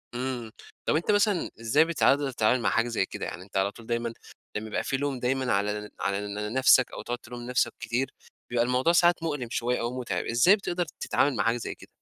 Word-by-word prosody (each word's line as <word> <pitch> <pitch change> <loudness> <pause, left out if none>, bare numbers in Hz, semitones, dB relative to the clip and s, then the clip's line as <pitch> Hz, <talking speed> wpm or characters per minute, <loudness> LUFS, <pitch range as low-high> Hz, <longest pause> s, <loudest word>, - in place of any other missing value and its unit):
إمم 125 -3 -3 0.3
طَب - - +2
أنتَ 165 +6 +1
مثلًا 205 -3 +2
إزاي 130 +8 +4
بتقدر 145 -4 +2
تتعامل 120 +1 +2
مع - - +2
حاجة 115 +1 +2
زي 115 -5 0
كده؟ - - -6
يعني 90 - -6
أنتَ 95 0 -6
على 95 +1 +2
طول 115 - -14
دايمًا 115 -1 -1 0.4
لمّا 105 +1 -3
يبقى 105 - -2
في 135 - -1
لوم 140 -2 -2
دايمًا 130 0 0
على 105 +1 0
ن 105 - -9
على 105 +1 -2
نفسك، 130 +1 +5
أو - - -7
تقعُد 120 0 -3
تلوم 120 -1 -9
نفسك 125 -2 +1
كتير، 125 +3 -2 0.4
بيبقى 120 -1 +2
الموضوع 125 +6 +2
ساعات 175 0 +4
مؤلِم 145 -7 -2
شوية 125 +1 -1
أو 120 +2 -3
متعِب، 95 -8 -2
إزاي 120 - +5
بتقدَر 180 -4 -2
تتعامَل 140 -1 +1
مع - - +1
حاجة 115 +1 +2
زي 120 - -5
كده؟ - - -15
120 Hz, 220 wpm, -27 LUFS, 115-135 Hz, 0.4 s, نفسك